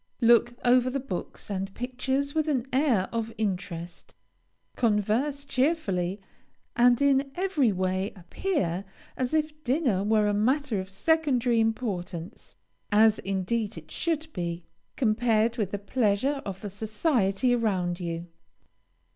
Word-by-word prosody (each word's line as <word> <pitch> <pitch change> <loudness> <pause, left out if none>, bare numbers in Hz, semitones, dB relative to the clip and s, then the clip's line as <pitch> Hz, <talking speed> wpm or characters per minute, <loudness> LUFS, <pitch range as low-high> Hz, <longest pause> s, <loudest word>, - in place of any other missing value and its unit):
Look 240 +1 +4
over 250 +1 +5
the 275 +2 -2
books 230 -5 -6
and 195 0 -3
pictures 265 +3 -2
with 315 -1 0
an 260 -5 0
air 255 -9 +2
of 230 -1 -2
interest, 180 -4 -4 0.6
converse 235 +6 +1
cheerfully, 215 - 0 0.6
and 240 0 +5
in 275 -1 +3
every 350 - +2
way 185 +1 -1
appear 185 - -2 0.3
as 255 -1 -2
if 305 -1 -1
dinner 250 - +1
were 215 0 +3
a 205 - +1
matter 245 +2 +1
of 190 0 -6
secondary 250 0 +2
importance, 195 -5 -3 0.4
(as, 215 +1 +5
indeed, 200 +3 -2
it - - -11
should 320 -2 -1
be,) 170 -1 -3 0.3
compared 230 0 +2
with 210 -5 0
the 205 - -3
pleasure 230 +6 0
of 190 -1 -6
the 205 -2 -6
society 215 - +1
around 190 -7 0
you. 170 -1 -4
225 Hz, 130 wpm, -27 LUFS, 195-265 Hz, 0.6 s, over